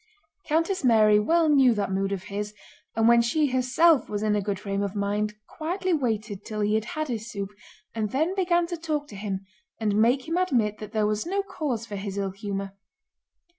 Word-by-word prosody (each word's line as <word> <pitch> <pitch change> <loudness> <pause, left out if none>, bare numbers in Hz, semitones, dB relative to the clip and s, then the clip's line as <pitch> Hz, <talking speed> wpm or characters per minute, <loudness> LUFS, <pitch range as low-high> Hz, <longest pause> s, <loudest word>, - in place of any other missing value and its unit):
Countess 330 +4 +1
Mary 215 -4 +5
well 330 +9 +3
knew 270 -5 +5
that 205 -2 -1
mood 195 +1 0
of 195 -2 -3
his, 210 +1 -5 0.4
and 225 0 +3
when 235 0 +6
she 275 +4 +1
herself 255 +3 +3
was 205 0 -2
in 210 -1 +2
a 205 - +1
good 200 -1 -2
frame 200 -1 -2
of 200 0 -3
mind 210 +1 -1
quietly 360 +3 -2
waited 220 - -1
till 215 -2 -4
he 205 +1 +1
had 220 0 +1
had 310 -3 -3
his 230 -3 -4
soup 200 -2 -5 0.4
and 215 -2 -1
then 315 - 0
began 350 -3 +2
to 345 0 -5
talk 305 -3 -2
to 205 - -10
him 195 -1 -4 0.3
and 210 -2 0
make 245 +5 +3
him 330 +2 0
admit 240 - +1
that 215 -1 -8
there 215 -2 +1
was 215 +7 -1
no 395 +2 0
cause 300 - -3
for 205 -3 -6
his 195 0 -5
ill 195 -1 -1
humor. 195 0 -4
220 Hz, 210 wpm, -26 LUFS, 205-305 Hz, 0.4 s, when